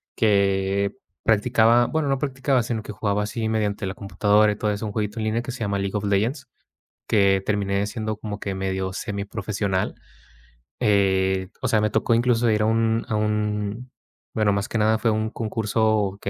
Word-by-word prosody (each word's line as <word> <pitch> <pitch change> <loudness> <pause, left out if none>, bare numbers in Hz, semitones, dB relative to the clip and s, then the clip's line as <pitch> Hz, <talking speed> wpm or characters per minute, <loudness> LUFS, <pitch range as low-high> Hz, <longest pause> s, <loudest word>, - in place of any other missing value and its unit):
que 100 -1 +1 0.3
practicaba. 115 +2 +4
Bueno, 155 0 -1
no 135 -1 +1
practicaba, 135 -2 0
sino 115 -2 -3
que - - -7
jugaba 105 0 -1
así 110 +2 -3
mediante 105 -3 -1
la 95 - -3
computadora 105 +1 +2
y 105 - -4
todo 105 -1 0
eso 105 +2 -3
un 105 - -3
jueguito 105 +1 -3
en - - -2
línea 110 +2 0
que 120 - -6
se - - -8
llama 100 -2 -1
League 100 +1 -3
of 105 - -4
Legends, 110 +8 0 0.6
que 100 -2 +3
terminé 100 -1 0
siendo 110 0 -3
como 105 -1 -5
que 100 -1 -4
medio 95 0 -2
semi 100 +1 -4
profesional, 100 -2 -2 0.9
eh, 95 -2 +2
o - - -1
sea, 110 - +2
me 105 0 +1
tocó 110 +2 +1
incluso 120 0 +2
ir 105 - +1
a - - +2
un 115 0 +1
a 110 - 0
un 105 +2 -2 0.4
bueno, 105 -2 +2
más 100 +2 -1
que 115 - -2
nada 110 +1 +3
fue 115 +1 +1
un 110 0 -1
concurso 110 -2 0
que - - -5
105 Hz, 190 wpm, -23 LUFS, 100-110 Hz, 0.9 s, practicaba